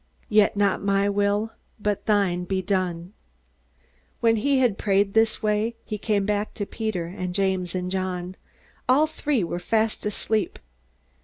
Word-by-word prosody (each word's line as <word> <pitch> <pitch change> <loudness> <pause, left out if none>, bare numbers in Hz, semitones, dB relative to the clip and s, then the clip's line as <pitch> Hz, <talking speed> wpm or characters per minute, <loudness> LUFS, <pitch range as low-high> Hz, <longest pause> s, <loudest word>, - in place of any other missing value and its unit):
Yet 210 -2 +4
not 200 -1 +2
my 200 0 +2
will, 205 +2 +1 0.3
but 210 -1 -2
thine, 195 -4 +2
be 190 +1 -1
done." 180 -1 -1 1.1
When 225 -1 +3
he 275 +5 +2
had 245 -6 +2
prayed 195 0 +2
this 225 0 +2
way, 215 +2 +1
he 210 -1 -4
came 205 -2 +1
back 210 +1 -1
to 205 - -3
Peter 215 -6 -3
and 180 0 -5
James 190 -2 0
and 180 0 -2
John. 185 -1 -3 0.5
All 280 +5 +6
three 295 -7 -1
were 175 +1 -3
fast 220 +4 0
asleep. 215 0 -1
205 Hz, 150 wpm, -25 LUFS, 185-220 Hz, 1.1 s, All